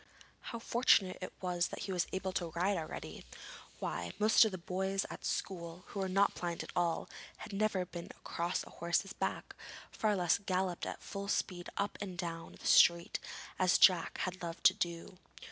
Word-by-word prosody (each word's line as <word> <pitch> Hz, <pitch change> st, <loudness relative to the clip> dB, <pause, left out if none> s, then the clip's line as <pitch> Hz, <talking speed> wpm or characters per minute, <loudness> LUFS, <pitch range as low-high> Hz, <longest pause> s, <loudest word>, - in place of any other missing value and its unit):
How 235 Hz, -, -4 dB
fortunate 230 Hz, -5 st, +3 dB
it 185 Hz, -, -5 dB
was 180 Hz, -1 st, +1 dB
that -, -, -7 dB
he 200 Hz, -, -3 dB
was 180 Hz, -2 st, 0 dB
able 190 Hz, 0 st, -2 dB
to 175 Hz, -2 st, -1 dB
ride 190 Hz, +4 st, +2 dB
already! 160 Hz, -3 st, -6 dB, 0.5 s
why, 85 Hz, 0 st, -3 dB
most 215 Hz, +2 st, +6 dB
of 220 Hz, -, +1 dB
the 185 Hz, -, -4 dB
boys 190 Hz, +2 st, -1 dB
at -, -, -8 dB
school, 170 Hz, -1 st, -3 dB
who 200 Hz, -, -5 dB
were 190 Hz, -1 st, -1 dB
not 195 Hz, +2 st, +3 dB
blind 170 Hz, -1 st, -3 dB
at -, -, -9 dB
all, 170 Hz, -2 st, +1 dB, 0.3 s
had -, -, -9 dB
never 195 Hz, -2 st, +1 dB
been 175 Hz, -1 st, -7 dB
across 170 Hz, +2 st, -3 dB
a -, -, -13 dB
horse's 175 Hz, +3 st, -1 dB
back, -, -, -3 dB, 0.4 s
far 215 Hz, -1 st, +1 dB
less 175 Hz, -3 st, +2 dB
galloped 185 Hz, -2 st, -1 dB
at -, -, -6 dB
full 200 Hz, 0 st, -5 dB
speed 180 Hz, -3 st, -1 dB
up 200 Hz, +1 st, -1 dB
and 190 Hz, -3 st, -5 dB
down 165 Hz, -2 st, -5 dB
the -, -, -12 dB
street 170 Hz, 0 st, +5 dB, 0.4 s
as 185 Hz, -1 st, +5 dB
Jack 180 Hz, -4 st, +5 dB
had 185 Hz, 0 st, -3 dB
loved 170 Hz, -1 st, -6 dB
to -, -, +8 dB
do! 170 Hz, +1 st, -4 dB
185 Hz, 185 wpm, -34 LUFS, 175-195 Hz, 0.5 s, to